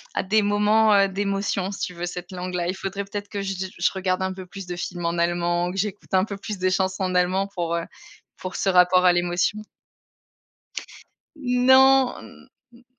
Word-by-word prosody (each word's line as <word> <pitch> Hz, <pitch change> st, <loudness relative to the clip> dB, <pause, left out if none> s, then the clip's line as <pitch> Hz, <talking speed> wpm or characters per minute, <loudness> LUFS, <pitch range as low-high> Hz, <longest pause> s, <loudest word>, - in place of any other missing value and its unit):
à -, -, +1 dB
des 215 Hz, +3 st, +2 dB
moments, 210 Hz, +1 st, +3 dB
heu, 200 Hz, -1 st, +5 dB
d'émotions 195 Hz, 0 st, -2 dB
si 200 Hz, -, -7 dB
tu -, -, -3 dB
veux, 175 Hz, 0 st, -5 dB
cette 180 Hz, +1 st, -7 dB
langue-là. 180 Hz, -1 st, -3 dB
Il 185 Hz, -, -2 dB
faudrait 195 Hz, +1 st, -4 dB
peut-être 205 Hz, +1 st, -6 dB
que 200 Hz, -, -4 dB
j 195 Hz, 0 st, -3 dB
j 190 Hz, 0 st, -4 dB
je 175 Hz, -, +2 dB
regarde 185 Hz, -1 st, -1 dB
un 190 Hz, 0 st, -1 dB
peu 185 Hz, -1 st, -9 dB
plus 195 Hz, +1 st, -9 dB
de 180 Hz, -, -5 dB
films 175 Hz, 0 st, -5 dB
en 170 Hz, +1 st, -1 dB
allemand, 175 Hz, +1 st, 0 dB
que 190 Hz, -, -7 dB
j'écoute 205 Hz, 0 st, -4 dB
un 190 Hz, 0 st, +4 dB
peu 205 Hz, -, -6 dB
plus 205 Hz, +1 st, -6 dB
de 185 Hz, 0 st, +1 dB
chansons 190 Hz, 0 st, 0 dB
en 185 Hz, -1 st, -1 dB
allemand 185 Hz, +2 st, +2 dB
pour, 175 Hz, -4 st, -3 dB
heu 170 Hz, 0 st, -2 dB, 0.5 s
pour 185 Hz, 0 st, -7 dB
ce -, -, -2 dB
rapport 180 Hz, 0 st, +5 dB
à 180 Hz, -, +6 dB
l'émotion. 175 Hz, +4 st, 0 dB, 1.7 s
Non. 260 Hz, 0 st, +3 dB, 0.2 s
N 240 Hz, +1 st, -20 dB
190 Hz, 200 wpm, -24 LUFS, 180-205 Hz, 1.7 s, à